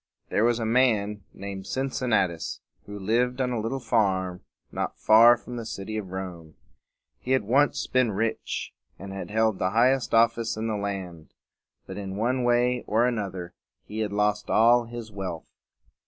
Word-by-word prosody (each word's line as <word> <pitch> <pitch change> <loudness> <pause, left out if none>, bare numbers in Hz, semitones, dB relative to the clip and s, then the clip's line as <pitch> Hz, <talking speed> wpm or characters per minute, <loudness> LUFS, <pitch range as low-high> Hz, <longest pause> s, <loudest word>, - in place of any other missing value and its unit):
There 105 - +1
was 120 0 +3
a 115 - -2
man 110 -4 +1
named 100 -1 -7
Cin 135 0 -2
cin 125 0 -2
na´tus 95 -7 0 0.3
who 105 0 -7
lived 120 +6 0
on 125 -1 0
a 120 - -1
little 115 +5 -2
farm 95 -7 0 0.3
not - - -3
far 115 +2 +7
from 120 +1 -8
the 115 - -4
city 110 -1 -6
of 105 -4 -4
Rome. 90 -4 -7 0.6
He 130 - -1
had 130 - +2
once 135 +7 +2
been 130 -3 +2
rich, 110 +3 -3 0.2
and 95 +2 -8
had 95 - -6
held 110 -2 +1
the 90 - +1
highest 120 +4 +2
office 115 0 +2
in 110 - -3
the 110 -1 -1
land; 95 -5 -5 0.5
but 95 - -8
in 95 -1 -5
one 125 +4 0
way 120 0 +2
or 115 +3 +3
another 100 -7 -3 0.3
he 110 - -6
had 105 -2 -1
lost 105 0 0
all 120 +2 +5
his 115 -1 -8
wealth. 95 -5 -6
110 Hz, 175 wpm, -26 LUFS, 100-120 Hz, 0.6 s, far